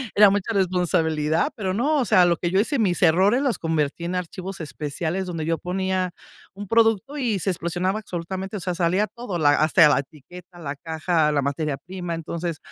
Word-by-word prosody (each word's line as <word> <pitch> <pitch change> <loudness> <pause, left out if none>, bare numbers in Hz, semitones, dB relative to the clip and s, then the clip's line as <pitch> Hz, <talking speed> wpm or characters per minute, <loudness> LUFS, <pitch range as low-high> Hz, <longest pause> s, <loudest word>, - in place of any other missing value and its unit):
Era 205 0 +8
mucha 205 +3 -1
responsabilidad, 165 -4 +1
pero 190 -4 -2
no, 275 +10 +1
o 255 - +1
sea, 185 -3 +5
lo 170 -1 +2
que 175 - -2
yo 190 - +3
hice, 275 +7 +1
mis 190 -6 +1
errores 190 +8 +4
los 270 -5 0
convertí 160 -1 -1
en 175 +2 -2
archivos 185 +2 -5
especiales 160 +4 -3
donde 165 -4 -4
yo 165 0 0
ponía 185 0 -2 0.4
un 205 +1 -8
producto 225 +5 +2
y 235 -8 0
se 195 - -1
explosionaba 180 +4 -2
absolutamente, 190 +1 -5
o - - -5
sea, 180 0 -3
salía 180 +4 +1
todo, 225 -8 -6
la 145 -2 +5
hasta 155 +2 +5
la 140 - +3
etiqueta, 175 +6 -11
la 145 -3 -5
caja, 160 +1 0
la 145 -1 +1
materia 140 +1 -2
prima. 175 +3 -6
Entonces, 165 0 -4
180 Hz, 195 wpm, -23 LUFS, 160-195 Hz, 0.4 s, Era